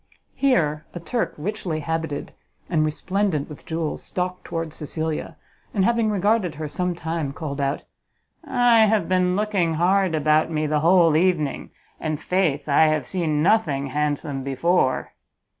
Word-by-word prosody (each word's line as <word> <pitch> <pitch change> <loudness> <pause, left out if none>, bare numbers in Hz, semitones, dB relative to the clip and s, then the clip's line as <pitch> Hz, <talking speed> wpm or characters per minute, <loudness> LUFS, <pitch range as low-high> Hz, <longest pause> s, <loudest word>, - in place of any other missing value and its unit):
Here 155 - +1
a - - -4
Turk, 235 +8 -2
richly 175 -2 -3
habited 160 -1 -3 0.4
and 155 -3 +3
resplendent 160 0 -1
with 150 - -12
jewels, 160 -1 -3
stalked 180 0 -3
towards 165 -2 -4
Cecilia, 155 +1 -4 0.4
and, 190 -2 +3
having 230 -1 +2
regarded 205 -3 +1
her 155 0 -4
some 180 +3 -2
time, 160 -4 -3
called 145 -3 -4
out, 140 +1 -1 0.6
"I 240 -3 +4
have 210 -5 +1
been 180 0 +2
looking 195 -6 0
hard 185 +1 +2
about 155 +1 +2
me 155 -1 -1
the 150 0 +1
whole 165 0 +5
evening, 160 -4 +1 0.3
and, 155 -2 -2
faith, 160 -5 0
I 150 +2 +5
have 155 -3 0
seen 155 -2 0
nothing 155 -9 +2
handsome 145 -1 -2
before!" 135 +1 0
165 Hz, 145 wpm, -23 LUFS, 150-185 Hz, 0.6 s, whole